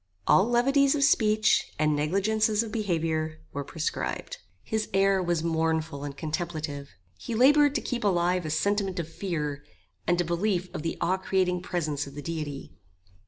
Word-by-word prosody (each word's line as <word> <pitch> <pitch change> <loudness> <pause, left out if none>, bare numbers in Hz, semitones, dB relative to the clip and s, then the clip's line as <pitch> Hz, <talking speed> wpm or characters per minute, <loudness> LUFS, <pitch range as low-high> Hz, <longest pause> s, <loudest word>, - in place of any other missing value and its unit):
All 200 +5 +4
levities 275 +4 +3
of 280 - +1
speech, 215 -5 +3
and 150 0 +2
negligences 210 +8 +1
of 225 - -7
behaviour, 160 -7 -1
were 140 - -3
proscribed. 160 +2 -4 0.2
His 220 -1 -2
air 195 0 +3
was 175 -2 0
mournful 160 -3 -1
and 145 -1 -6
contemplative. 155 -3 -4 0.3
He 235 - -4
laboured 290 +4 +5
to 255 - +1
keep 245 -1 -3
alive 180 -2 +2
a 155 - -4
sentiment 195 +4 0
of 165 - -3
fear, 150 -5 -4 0.4
and 175 0 +2
a 175 - +2
belief 180 +2 -1
of - - -4
the 165 +1 -3
awe 180 +2 +2
creating 185 -1 0
presence 155 -6 -2
of 140 - -11
the 145 - -7
Deity. 150 -4 -5
175 Hz, 165 wpm, -27 LUFS, 155-210 Hz, 0.4 s, laboured